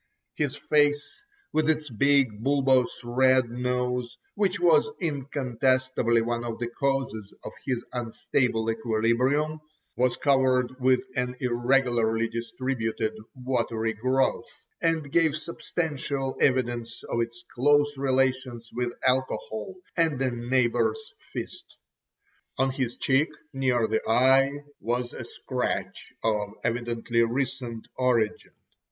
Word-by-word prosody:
His 145 -2 -1
face, 145 0 +2 0.5
with 155 0 +2
its 155 -1 +1
big, 125 -3 +2
bulbous 135 -2 +3
red 130 0 +3
nose, 125 0 -2 0.2
which 200 -2 0
was 170 +2 +4
incontestably 130 -5 +1
one 120 0 -2
of 115 -1 -4
the 120 -1 -3
causes 120 -6 -2
of - - -6 0.2
his 125 -3 -1
unstable 115 -1 0
equilibrium, 120 +7 +1 0.4
was 125 0 +1
covered 130 -3 +2
with 130 0 +3
an 125 0 -1
irregularly 120 -2 +2
distributed 115 -1 -2 0.2
watery 120 -3 -1
growth, 130 +1 0 0.3
and 160 -4 0
gave 160 -2 +3
substantial 145 -4 -3
evidence 120 -3 0
of 120 - -1
its 115 +1 -5
close 145 +3 +3
relations 130 -3 0
with 120 0 -1
alcohol 130 - 0 0.2
and 160 -5 +2
a 130 -1 +1
neighbour's 130 - 0 0.2
fist. - - -7 0.8
On 135 0 +2
his 130 -3 -3
cheek 140 +4 +2 0.2
near 125 -4 +1
the 110 0 0
eye 135 +4 +4 0.2
was 120 +3 -2
a - - -7
scratch - - -4
of 105 -2 0
evidently 115 0 0
recent 120 -1 -2
origin. 120 -4 0
125 Hz, 110 wpm, -27 LUFS, 120-135 Hz, 0.8 s, was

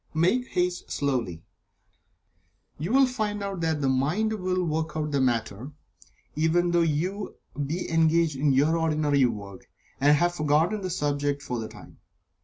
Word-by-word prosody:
Make 205 +11 +2
haste 180 0 -2
slowly. 120 - -2 1.4
You 165 +7 -3
will 270 +1 +6
find 215 -5 -2
that 165 -6 -2
the 135 - +1
mind 155 +12 +1
will 185 -3 -1
work 155 -1 -2
out 150 -1 -2
the 140 -2 +1
matter, 120 +1 -1 0.6
even 165 +3 +2
though 170 0 +3
you 170 +6 -1 0.3
be 170 +5 -3
engaged 165 -1 +2
in 140 +2 +2
your 145 +5 +3
ordinary 150 -4 +2
work, 100 -5 -5 0.3
and 145 +2 +5
have 175 +3 +2
forgotten 160 +6 +1
the 185 - -3
subject 145 -4 -1
for 125 -3 -3
the 110 - -4
time. - - -14
155 Hz, 150 wpm, -26 LUFS, 140-175 Hz, 1.4 s, will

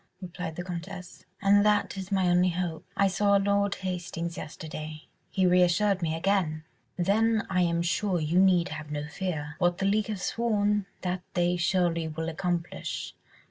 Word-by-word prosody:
replied 180 -3 -6
the 175 - -4
Comtesse, 180 +1 -7 0.2
"and 200 +1 +5
that 210 -1 +2
is 190 0 -6
my 190 -2 +2
only 180 +1 +4
hope. 175 -2 -3
I 200 - +4
saw 200 +1 +2
Lord 200 0 +1
Hastings 175 -2 -4
yesterday... 155 -1 -7 0.3
he 190 -2 +1
reassured 180 +2 +3
me 160 -1 0
again." 165 -3 0 0.3
"Then 215 +4 +2
I 180 -1 +2
am 170 -1 +1
sure 180 +1 0
you 160 +3 +2
need 185 -2 +4
have 150 0 -7
no 150 0 -3
fear. 150 -3 -4
What 175 -1 +2
the 195 - -1
league 205 +2 +2
have 210 -3 -3
sworn, 210 -2 0
that 180 0 -2
they 175 0 +2
surely 170 -1 +1
will 160 +1 -3
accomplish. 170 - -3
180 Hz, 165 wpm, -28 LUFS, 170-195 Hz, 0.3 s, and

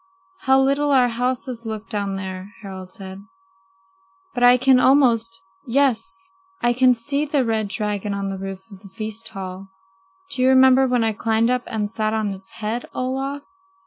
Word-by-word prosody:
"How 265 0 +3
little 280 +2 +2
our 255 -3 +4
houses 245 0 -2
look 220 -1 -6
down 200 -3 -3
there!" 190 +1 -6
Harald 190 -2 -8
said. 190 0 -10 1.1
"But 245 - -3
I 245 0 +7
can 260 0 +4
almost 230 -5 +3 0.2
yes, 270 +7 +1 0.4
I 240 0 +2
can 255 0 +4
see 280 +5 -2
the 285 -3 0
red 220 -2 0
dragon 210 -1 -2
on 200 0 -3
the 195 -1 -5
roof 195 0 -6
of 195 - -12
the 195 0 -14
feast 215 +3 -7
hall. 190 0 -7 0.6
Do 255 - -3
you 255 - +5
remember 265 0 +6
when 245 -2 +1
I 220 -1 +1
climbed 225 +2 +1
up 250 0 +1
and 215 -2 -2
sat 215 0 -2
on 215 -2 -1
his 190 0 -10
head, 225 +3 -4
Olaf?" 270 +2 -3
230 Hz, 175 wpm, -22 LUFS, 200-255 Hz, 1.1 s, I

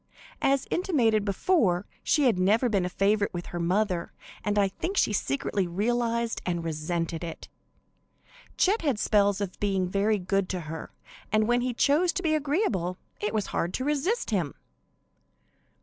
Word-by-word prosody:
As 275 0 +2
intimated 240 - +2
before, 200 - +1 0.2
she 300 - +2
had 235 -8 +3
never 215 +7 +3
been 195 -4 +1
a - - -2
favorite 200 +1 +1
with 175 - -4
her 175 - -2
mother, 180 0 0 0.3
and 205 0 0
I 200 -1 +4
think 365 - -4
she - - +3
secretly 180 +3 -1
realized 235 +5 0
and 175 -2 -2
resented 165 +1 -2
it. 165 -1 -7 1.1
Chet 410 +5 +3
had 280 -8 +1
spells 205 -1 +2
of 190 -3 -4
being 195 -3 0
very 200 +3 +1
good 195 0 -1
to 185 -2 -2
her, 160 0 -7 0.4
and 215 0 +3
when 240 +1 +3
he 250 +1 0
chose 310 +8 +3
to 370 - -3
be 315 -2 +2
agreeable 275 - 0 0.2
it 210 - -1
was 210 -2 -1
hard 175 +2 -1
to 260 - -2
resist 300 - 0
him. 175 -9 -1
205 Hz, 165 wpm, -27 LUFS, 180-245 Hz, 1.1 s, I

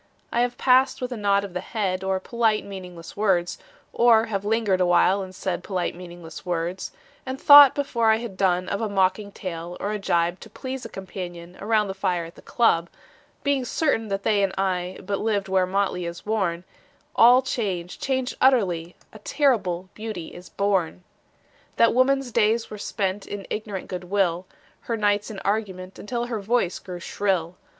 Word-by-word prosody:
I 235 - +1
have 245 0 -1
passed 260 +1 +3
with 250 0 -4
a - - -3
nod 200 -2 +2
of 200 -3 -7
the 180 - -2
head 190 -4 -2
Or 190 0 0
polite 225 +1 0
meaningless 180 -4 -9
words, 190 -4 +1 0.3
Or 230 -2 +5
have 200 -3 -3
lingered 210 -3 +1
awhile 180 +2 +4
and 185 -1 -8
said 180 -2 -3
Polite 185 -3 -2
meaningless 170 -3 -10
words, 175 +1 -3 0.3
And 260 0 -5
thought 285 -2 +9
before 235 -5 +1
I 220 - +6
had 225 -3 -6
done 185 -1 +1
Of 200 - -2
a 220 - -1
mocking 195 +1 +1
tale 175 -2 -6
or 205 - -2
a 210 - -2
gibe 175 -1 0
To - - -12
please 260 -1 -6
a - - -6
companion 180 -3 -8
Around 215 0 +2
the 190 - -4
fire 185 -3 -1
at 165 - -11
the - - -16
club, 175 -8 +2 0.5
Being 280 -2 +1
certain 245 -4 0
that 195 -1 -3
they 210 -2 +2
and 195 -1 0
I 185 -1 -1
But 200 +1 -2
lived 205 -3 0
where 190 -1 +2
motley 185 -2 -1
is 170 0 -8
worn: 190 -6 -1 0.5
All 245 +3 +7
changed, 190 -9 -3
changed 260 -2 -1
utterly: 185 -10 +2 0.2
A 215 - -11
terrible 200 - 0
beauty 215 -6 -6
is 180 - -11
born. 190 -3 -1 0.7
That 230 - +4
woman's 260 +1 +2
days 225 0 +1
were 210 - -7
spent 195 -1 -3
In 200 -2 -6
ignorant 210 -3 -4
good 180 -1 -6
will, 185 -2 0 0.3
Her 230 - -3
nights 205 0 +1
in 215 - -7
argument 195 -3 -3
Until 240 +2 -3
her 235 -3 -3
voice 205 -3 0
grew 180 -2 -8
shrill. 180 -2 -1
200 Hz, 180 wpm, -24 LUFS, 180-225 Hz, 0.7 s, thought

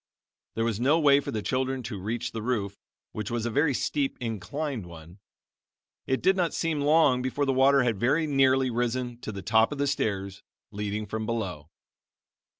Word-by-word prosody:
There 115 - 0
was 115 -3 -1
no 140 +7 +3
way 140 -2 +5
for - - -6
the 110 -2 -3
children 130 +4 -1
to 105 -5 -6
reach 110 +4 -3
the 110 - -5
roof, 105 -4 -2 0.3
which 105 -1 -5
was 120 -1 -2
a 120 - -1
very 145 +2 +2
steep, 140 +1 -1
inclined 115 - -4
one. 85 +2 -13 0.9
It 130 - 0
did 190 +2 +4
not 180 -3 0
seem 160 -3 -1
long 145 -3 +4
before 130 +3 -1
the 135 - +1
water 135 +1 +4
had 115 -5 0
very 145 +7 +2
nearly 135 -3 +3
risen 120 0 -2
to 110 - -5
the 100 -2 -7
top 110 +5 +3
of 145 - -4
the 140 - +1
stairs 100 -8 -2 0.3
leading 105 +1 -3
from 110 +1 -4
below. 95 -10 -4
120 Hz, 185 wpm, -27 LUFS, 105-140 Hz, 0.9 s, way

